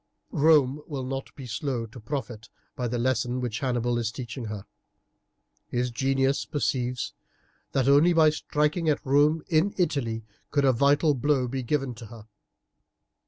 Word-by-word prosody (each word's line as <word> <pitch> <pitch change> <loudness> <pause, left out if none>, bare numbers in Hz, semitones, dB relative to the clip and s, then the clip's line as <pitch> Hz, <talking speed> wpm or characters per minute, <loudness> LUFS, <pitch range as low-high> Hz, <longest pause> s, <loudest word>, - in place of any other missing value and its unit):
"Rome 150 -2 +4
will 140 -4 -4
not 135 +1 -4
be 135 - -8
slow 120 0 -3
to 120 +3 -12
profit 120 -2 -5 0.3
by 125 - -2
the 120 +1 -2
lesson 125 0 0
which 120 -4 -3
Hannibal 120 -2 0
is 115 -2 -1
teaching 120 0 -6
her. 105 -2 -6 1.0
His 125 0 -1
genius 135 +2 +1
perceives 125 -4 -2 0.6
that 135 -1 +2
only 145 +5 +6
by 160 -2 +5
striking 150 +2 0
at 150 - 0
Rome 145 +3 +3
in 175 +3 +2
Italy 120 - -1 0.2
could 145 -1 +2
a 130 - +5
vital 145 +4 +3
blow 135 -1 +1
be 130 +2 -3
given 135 0 -1
to 115 -1 -10
her. 110 -1 -12
135 Hz, 155 wpm, -26 LUFS, 120-145 Hz, 1.0 s, only